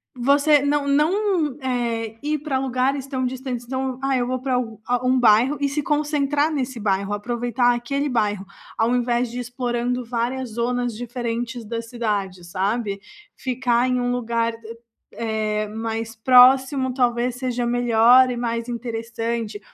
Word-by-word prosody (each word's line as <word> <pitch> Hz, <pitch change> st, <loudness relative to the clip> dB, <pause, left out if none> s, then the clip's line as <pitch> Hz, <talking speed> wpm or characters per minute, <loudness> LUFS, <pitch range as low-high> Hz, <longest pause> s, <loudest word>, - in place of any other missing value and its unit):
você 280 Hz, +3 st, +4 dB
não 285 Hz, 0 st, 0 dB
não, 315 Hz, 0 st, +1 dB
eh, 235 Hz, -3 st, -2 dB
ir 305 Hz, +1 st, 0 dB
para 280 Hz, -3 st, -2 dB
lugares 265 Hz, +1 st, -1 dB
tão 260 Hz, -2 st, -2 dB
distantes. 250 Hz, -1 st, -4 dB
Então, 260 Hz, 0 st, -3 dB
"Ah 270 Hz, -1 st, +1 dB
eu 245 Hz, 0 st, 0 dB
vou 255 Hz, 0 st, -2 dB
pra 255 Hz, -1 st, -1 dB, 0.3 s
a 245 Hz, 0 st, 0 dB
um 255 Hz, 0 st, +3 dB
bairro", 245 Hz, +5 st, +4 dB
e 285 Hz, -, +1 dB
se 285 Hz, +2 st, -2 dB
concentrar 295 Hz, 0 st, +1 dB
nesse 260 Hz, -4 st, -3 dB
bairro, 200 Hz, -1 st, 0 dB
aproveitar 240 Hz, +3 st, 0 dB
aquele 275 Hz, +4 st, -2 dB
bairro, 210 Hz, -5 st, 0 dB, 0.3 s
ao 230 Hz, +2 st, +2 dB
invés 240 Hz, 0 st, 0 dB
de 245 Hz, -, -7 dB
ir -, -, -2 dB
explorando 245 Hz, 0 st, -2 dB
várias 240 Hz, +1 st, -2 dB
zonas 240 Hz, 0 st, -1 dB
diferentes 240 Hz, 0 st, -4 dB
da 230 Hz, +1 st, -3 dB
cidade 205 Hz, -6 st, -3 dB
sabe, 200 Hz, +3 st, -2 dB, 0.3 s
ficar 250 Hz, -1 st, 0 dB
em 250 Hz, 0 st, +1 dB
um 245 Hz, 0 st, 0 dB
lugar, 230 Hz, -1 st, -1 dB, 0.6 s
eh, 215 Hz, -2 st, -2 dB
mais 225 Hz, +1 st, -4 dB
próximo, 260 Hz, +2 st, +5 dB
talvez 245 Hz, -1 st, +1 dB
seja 245 Hz, -1 st, -2 dB
melhor 245 Hz, +1 st, +5 dB
e 240 Hz, -, -4 dB
mais 235 Hz, 0 st, -2 dB
interessante 230 Hz, -2 st, -4 dB
245 Hz, 150 wpm, -22 LUFS, 230-260 Hz, 0.6 s, próximo